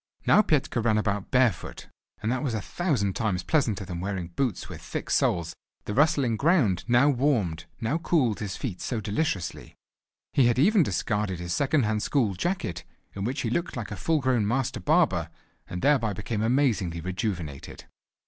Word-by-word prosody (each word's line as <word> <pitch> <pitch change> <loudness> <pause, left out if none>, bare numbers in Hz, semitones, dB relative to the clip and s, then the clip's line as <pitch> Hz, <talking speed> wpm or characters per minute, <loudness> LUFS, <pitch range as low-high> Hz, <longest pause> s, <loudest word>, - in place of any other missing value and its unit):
Now 210 - +6
Petka 145 - +1
ran 110 -2 +3
about 105 -2 -1
bare 125 -2 +4
foot, 80 - -10 0.4
and 110 - 0
that 130 0 -1
was 130 -6 -1
a - - -1
thousand 115 - -1
times 100 -6 -1
pleasanter 110 - 0
than 90 -1 -5
wearing 95 -2 -3
boots 120 +2 -2
with - - -9
thick - - -5
soles: 85 -1 +1 0.3
the 105 - -3
rustling 140 -4 +3
ground 140 - +2
now 120 +3 +5
warmed, 120 - +1
now 120 +9 -1
cooled 150 - +1
his 100 -3 -4
feet 105 -10 -5
so 120 - -2
deliciously. 105 - -3 0.6
He 130 -4 +5
had 120 - +2
even 195 - +5
discarded 105 - -1
his 85 0 -3
second 140 - +2
hand 105 0 0
school 115 -7 +1
jacket, 90 - -2 0.3
in 100 0 -4
which 130 +5 -2
he 115 - -2
looked 170 +1 -2
like 115 -3 -5
a - - -3
full 155 - 0
grown 125 -5 +1
master 130 +2 -1
barber, 150 - +2 0.4
and 90 - -5
thereby 130 -8 +3
became 105 +2 -3
amazingly 110 -8 +1
rejuvenated. 90 - -4
115 Hz, 175 wpm, -26 LUFS, 95-140 Hz, 0.6 s, Now